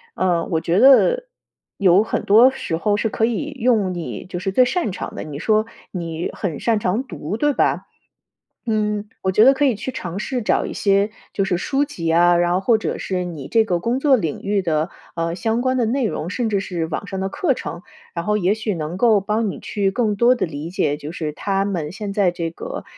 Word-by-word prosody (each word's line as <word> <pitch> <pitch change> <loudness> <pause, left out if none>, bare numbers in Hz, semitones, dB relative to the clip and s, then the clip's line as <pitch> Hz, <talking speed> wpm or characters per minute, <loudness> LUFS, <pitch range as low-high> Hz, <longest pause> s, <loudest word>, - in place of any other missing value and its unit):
嗯， 175 -3 0
我 160 - +1
觉 175 +4 +1
得 - - +5 0.5
有 190 0 +5
很 - - -2
多 225 +6 +7
时 265 -10 -4
候 205 +5 +1
是 225 - 0
可 220 - -2
以 265 +6 -2
用 220 -6 +2
你 140 -11 -6
就 180 -1 -5
是 190 +1 -2
最 250 +5 +5
擅 335 - -1
长 - - -6
的， - - -6
你 150 -2 -7
说 215 +5 +1 0.2
你 170 -2 -4
很 170 -7 -4
擅 225 -3 +1
长 210 +7 0
读， 175 - -5
对 295 +1 +2
吧？ - - +1 0.8
嗯， 210 -1 -1
我 190 - +1
觉 210 +4 +5
得 270 +2 +7
可 290 +2 +2
以 260 - +3
去 225 +5 -5
尝 185 -7 -5
试 245 +1 -3
找 - - +1
一 - - -5
些 200 +1 +2 0.2
就 195 - 0
是 185 -2 0
书 275 +9 0
籍 170 - -3
啊， 175 +1 +5
然 175 0 +2
后 185 - +2
或 220 +3 +3
者 - - -3
是 185 -1 -2
你 160 -6 -6
这 225 -1 +3
个 175 -4 0
工 240 +7 -1
作 275 -2 +4
领 165 -10 -3
域 200 0 +1
的， 160 -1 -1 0.2
呃， 165 0 -1
相 225 +6 -1
关 260 0 +1
的 240 - +2
内 255 +1 0
容， 175 -5 -3
甚 240 +4 -1
至 205 -3 +1
是 175 -4 -3
网 185 +5 -5
上 190 - -4
的 190 - -1
课 270 - 0
程， 170 +2 -6 0.3
然 170 -1 -3
后 210 +2 +1
也 190 0 +2
许 215 -2 -3
能 160 +2 -4
够 220 -1 +4
帮 210 +2 -1
你 - - -6
去 200 -2 -1
更 210 0 0
多 240 +4 +4
地 230 - -1
理 155 0 -6
解， 165 -6 0
就 150 +2 -7
是 155 -3 -4
他 195 +3 -1
们 170 -7 -3
现 200 +1 -5
在 200 -3 +3
这 170 -2 -4
个 - - -7
200 Hz, 250 characters per minute, -21 LUFS, 175-225 Hz, 0.8 s, 多